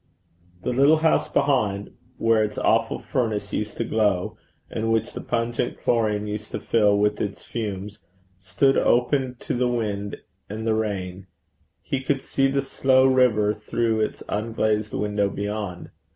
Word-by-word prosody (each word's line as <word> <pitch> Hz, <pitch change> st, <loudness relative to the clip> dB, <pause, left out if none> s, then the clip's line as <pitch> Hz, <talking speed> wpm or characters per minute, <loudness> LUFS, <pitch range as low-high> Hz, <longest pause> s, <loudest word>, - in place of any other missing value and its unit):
The 125 Hz, -, -1 dB
little 140 Hz, +5 st, +5 dB
house 160 Hz, 0 st, +2 dB
behind, 110 Hz, -9 st, +1 dB, 0.3 s
where 115 Hz, -1 st, +3 dB
its 105 Hz, -1 st, -3 dB
awful 115 Hz, 0 st, +2 dB
furnace 110 Hz, -6 st, -2 dB
used 105 Hz, -1 st, -3 dB
to -, -, 0 dB
glow, 105 Hz, -5 st, 0 dB, 0.3 s
and 115 Hz, +1 st, -2 dB
which 115 Hz, 0 st, 0 dB
the -, -, -5 dB
pungent 120 Hz, 0 st, -2 dB
chlorine 105 Hz, -3 st, +1 dB
used 105 Hz, 0 st, -5 dB
to -, -, -2 dB
fill 105 Hz, -3 st, +3 dB
with 105 Hz, +1 st, +1 dB
its 100 Hz, -1 st, -4 dB
fumes, 105 Hz, -3 st, -5 dB, 0.4 s
stood 95 Hz, +9 st, +2 dB
open 125 Hz, +1 st, +2 dB
to -, -, -3 dB
the 125 Hz, 0 st, +1 dB
wind 105 Hz, -4 st, -2 dB, 0.3 s
and 110 Hz, +2 st, -5 dB
the 110 Hz, -, +2 dB
rain: 95 Hz, -4 st, -3 dB, 0.6 s
he 135 Hz, -, -2 dB
could 135 Hz, 0 st, -1 dB
see 135 Hz, 0 st, +1 dB
the 135 Hz, 0 st, +1 dB
slow 130 Hz, -1 st, +3 dB
river 125 Hz, -6 st, +4 dB
through 110 Hz, +1 st, -1 dB
its 110 Hz, -, -2 dB
unglazed 110 Hz, 0 st, -1 dB
window 105 Hz, -1 st, 0 dB
beyond. 100 Hz, -3 st, -4 dB
110 Hz, 150 wpm, -24 LUFS, 105-120 Hz, 0.6 s, little